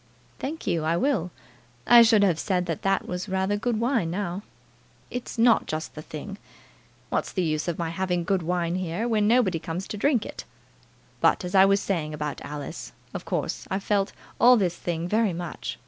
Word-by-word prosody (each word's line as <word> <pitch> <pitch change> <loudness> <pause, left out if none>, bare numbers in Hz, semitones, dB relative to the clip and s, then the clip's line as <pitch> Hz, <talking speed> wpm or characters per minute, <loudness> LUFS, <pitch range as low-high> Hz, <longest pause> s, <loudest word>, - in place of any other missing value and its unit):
"Thank 310 +4 -5
you, 165 -2 0
I 165 +2 +1
will. 225 - +1 0.6
I 240 -1 +9
should 225 -3 +5
have 175 -5 +2
said 180 -3 0
that 165 -3 -3
that 195 0 0
was 180 +3 -4
rather 190 +2 0
good 220 +1 -1
wine, 235 -7 +1
now." 185 +1 -3 0.7
"It's 245 -1 -5
not 230 0 +4
just 155 +1 -4
the 155 - -7
thing. 195 +7 -8 0.7
What's - - -1
the 185 - -1
use 155 -1 -1
of 170 - -1
my 165 -2 -2
having 180 0 -1
good 190 +1 +1
wine 170 0 -1
here, 185 +5 -2
when 215 -3 +2
nobody 215 -8 +3
comes 170 +3 -5
to 215 - -4
drink 245 0 +2
it? - - -7 0.8
But, - - +3
as 180 - -5
I 190 0 +7
was 200 0 +3
saying 155 -6 -2
about 150 -1 -4
Alice, 145 -1 -7 0.2
of - - -6
course - - -3
I've 195 +1 -2
felt 200 -1 +1 0.3
all 250 +1 +7
this 180 -5 +1
thing 170 -1 -3
very 215 0 +2
much. 175 0 -5
185 Hz, 195 wpm, -26 LUFS, 170-210 Hz, 0.8 s, I